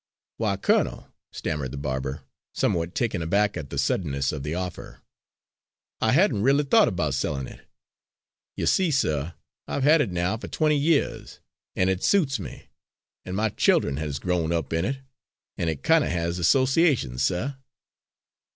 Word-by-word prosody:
"Why, 105 -3 0
colonel," - - 0 0.2
stammered 75 -4 -3
the 70 - -7
barber, 65 -1 -3 0.3
somewhat 85 0 0
taken 105 -7 -1
aback 100 +6 +1
at 70 - -6
the 70 - -6
suddenness 70 -1 0
of 75 - -5
the 75 +4 -3
offer, 90 -1 -6 1.0
"I 110 - +3
hadn' 145 - +3
r'ally 140 +5 +3
thought 120 -6 +4
'bout 75 -5 0
sellin' 70 0 -2
it. - - -12 0.9
You - - -2
see, 185 -3 +3
suh, 80 - 0 0.3
I've 140 - -2
had 150 +2 +5
it 145 - 0
now 90 +4 -1
for - - -8
twenty 155 -1 +1
years, 145 +1 0 0.4
and 90 - +2
it 95 -1 0
suits 150 - +2
me, 90 - -9 0.6
an' 90 - -5
my 110 +2 +1
child'en 70 -7 +2
has 75 -2 -3
growed 85 0 -1
up 80 -3 -2
in 80 +2 0
it 135 +3 -3 0.5
an' 85 - -1
it 75 -4 -4
kind - - +4
of - - -2
has 85 +1 -2
associations, 130 - +2
suh." 95 - 0
90 Hz, 160 wpm, -25 LUFS, -, 1.0 s, had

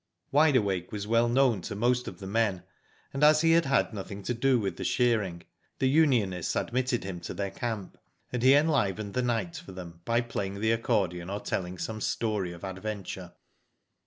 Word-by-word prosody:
Wide 145 0 +5
Awake 95 -6 0
was 105 -1 -4
well 115 +2 +3
known 120 -5 +3
to 100 - -5
most 125 +3 +1
of - - -7
the 100 - -9
men, 100 -2 0 0.5
and 135 - -1
as 155 +1 +6
he 165 0 +4
had 135 -8 +3
nothing 100 0 -6
to 120 - -1
do 125 +1 +2
with 100 -3 -3
the - - -4
shear 120 -3 +2
ing 85 -3 -6 0.3
the 130 - +2
unionists 125 - +2
admitted 125 0 0
him 95 -2 -5
to - - -7
their 100 -1 -3
camp, 110 -3 -5 0.3
and 125 - -1
he 130 +3 +7
enlivened 110 - +1
the 125 - +1
night 115 -8 -1
for 95 - -10
them 85 -2 -9
by 115 +3 +1
playing, 100 -4 -4
the 110 +2 +2
accordion 95 -7 0
or 100 +1 -3
telling 90 -2 -3
some 110 +4 -4
story 105 -6 -1
of 85 +1 -11
adventure. 95 -2 -5
110 Hz, 190 wpm, -28 LUFS, 95-125 Hz, 0.5 s, he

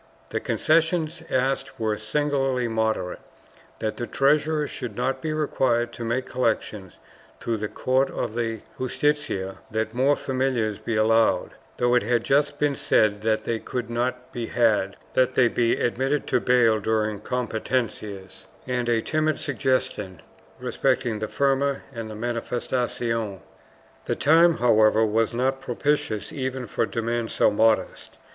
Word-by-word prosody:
The - - -1
concessions 165 0 +1
asked 135 +1 0
for 115 -5 -3
were 105 - 0
singularly 135 +1 0
moderate 110 -5 -1 0.3
— - - -28
that 110 -1 -2
the 120 - -3
treasurer 150 +2 +2
should 120 -6 -6
not 130 +3 -1
be 155 - -2
required 130 -6 +1
to 115 - -6
make 120 +3 -1
collections 110 -6 -2 0.4
through 115 -1 -2
the 105 0 -3
court 130 +5 +1
of - - -3
the 115 -2 -2 0.2
Justicia, 130 -8 -1
that 110 0 -2
more 135 +4 +3
familiars 130 -6 -1
be 115 - -3
allowed 110 -3 +3
— - - -31
though 120 0 +2
it 125 - +4
had 120 +2 +1
just 145 +1 +2
been 145 -1 +1
said 105 -5 +2
that 110 0 +1
they 115 -1 -2
could 120 -1 -4
not 125 +1 -2
be 120 -2 -3
had 110 -5 +2
— - - -29
that 130 0 +2
they 125 - +5
be 115 0 +1
admitted 135 +4 0
to - - +1
bail 120 -3 +3
during 110 0 0
competencias, 110 -5 -3 0.2
and 125 -1 -1
a 115 -1 +2
timid 155 0 0
suggestion 130 - -2 0.4
respecting 120 -4 0
the 110 - -2
firma 140 +1 +1
and 115 -2 -6
mariifestacion. 115 -1 -2 0.7
The - - -1
time, 165 +3 +5
however, 110 -2 +4
was 110 +1 +1
not 130 +2 0
propitious 125 -4 -1
even 130 -2 -3
for 115 - -1
demands 115 +2 -2
so - - +4
modest. 110 +1 +1
120 Hz, 150 wpm, -25 LUFS, 110-135 Hz, 0.7 s, they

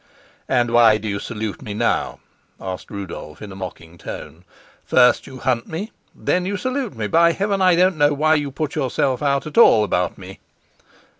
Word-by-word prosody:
"And 120 -2 +2
why 115 -2 +6
do 110 - -6
you 100 -1 -2
salute 110 -2 -5
me 105 -6 -6
now?" - - 0 0.4
asked 95 -1 -6
Rudolf 90 -5 -8
in 105 -2 -9
a - - -9
mocking 85 -3 -9
tone. 80 +4 -9 0.4
"First 125 -1 +3
you 130 -1 -10
hunt 125 -2 -1
me, 190 +8 -5 0.2
then 180 - 0
you 200 +2 -2
salute 255 - -3
me. 110 -2 -3
By 170 +8 +4
Heaven, 200 +1 -1
I 185 -2 +5
don't 180 0 +3
know 145 0 +4
why 155 +2 +3
you 145 -2 0
put 150 +2 -4
yourself 135 -2 -1
out 140 -1 +1
at 155 +9 0
all 110 - +7
about 90 -3 -1
me!" 95 0 -11
130 Hz, 190 wpm, -21 LUFS, 100-160 Hz, 0.4 s, all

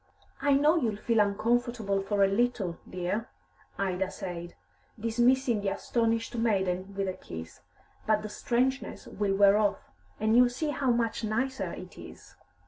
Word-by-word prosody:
"I 285 0 +3
know 300 +4 +4
you'll 230 -9 0
feel 225 +2 0
uncomfortable 215 0 +1
for 200 0 +1
a - - +6
little, 200 -4 0
dear," 185 +6 -3 0.5
Ida 190 -1 -1
said, 175 -1 -7 0.4
dismissing 240 +1 +2
the 200 - 0
astonished 230 0 -1
maiden 195 -4 0
with 195 0 -1
a 185 - -1
kiss, 80 - -9 0.5
"but 215 -1 +2
the 215 - -5
strangeness 255 +5 -1
will 200 -1 -1
wear 200 +1 +6
off; 205 - -1 0.3
and 220 +1 +2
you'll 245 0 +6
see 295 +5 -2
how 275 -2 -1
much 235 -1 0
nicer 260 +5 -1
it - - -10
is." - - -12
215 Hz, 150 wpm, -29 LUFS, 195-240 Hz, 0.5 s, a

